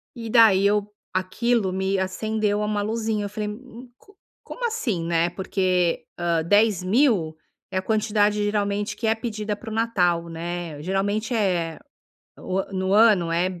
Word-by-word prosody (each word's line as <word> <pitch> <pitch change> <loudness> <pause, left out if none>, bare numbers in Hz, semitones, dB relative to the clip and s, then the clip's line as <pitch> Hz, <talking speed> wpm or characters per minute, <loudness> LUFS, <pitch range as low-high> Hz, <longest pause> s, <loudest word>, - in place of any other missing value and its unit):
E 230 -2 -6
daí 215 -4 +6
eu 205 0 +2 0.3
aquilo 190 +2 0
me 190 +1 -1
acendeu 210 +2 -1
uma 210 -1 -1
luzinha. 220 -1 -2
Eu - - -4
falei: 210 0 -4
"M 245 +2 -11
co 405 +6 -23 0.3
como - - -5
assim, 235 - -2
né?", 170 0 +1
porque, 185 -1 0
hã, 170 -2 +1
10.000 205 - +2 0.4
é 185 - -2
a - - +1
quantidade 210 0 +1
geralmente 205 0 -1
que 225 - -2
é 220 - +3
pedida 215 -2 -4
para 220 +2 -10
o - - -4
Natal, 180 -7 +1
né. 165 -2 -5
Geralmente 205 +6 -1
é 180 -7 0 0.6
o 185 - -3
a 195 - -8
no 190 0 -1
ano, 205 -6 +5
é 175 +1 -1
205 Hz, 160 wpm, -24 LUFS, 185-220 Hz, 0.6 s, daí